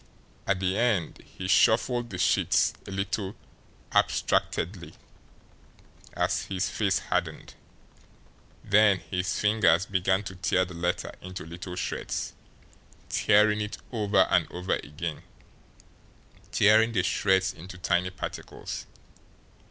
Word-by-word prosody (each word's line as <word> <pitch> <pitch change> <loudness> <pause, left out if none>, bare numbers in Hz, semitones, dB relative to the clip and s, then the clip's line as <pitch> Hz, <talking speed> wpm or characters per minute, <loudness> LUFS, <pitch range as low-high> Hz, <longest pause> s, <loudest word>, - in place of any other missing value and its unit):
At 100 - +1
the 95 +2 0
end 105 -9 0
he 95 - -8
shuffled 120 +4 +3
the - - -6
sheets - - +2
a - - -7
little 95 +1 -3 0.6
abstractedly, 85 0 0 1.2
as - - 0
his 95 -1 -2
face - - +1
hardened. - - -3 1.1
Then 105 -1 +5
his 90 0 -2
fingers 105 -4 +3
began 95 +1 +1
to 95 -2 -7
tear 90 +1 +1
the 90 - -10
letter 85 +1 -2
into 95 -1 -7
little 90 +2 -7
shreds, 90 0 -3 0.8
tearing 105 0 +3
it 105 0 -4
over 105 -4 +2
and - - +2
over 90 +1 -2
again, 75 +1 -4 1.3
tearing 110 +2 +4
the 95 -5 +2
shreds 95 0 +2
into 90 +3 -11
tiny 90 0 0
particles. 90 0 -7
95 Hz, 115 wpm, -27 LUFS, 90-105 Hz, 1.3 s, Then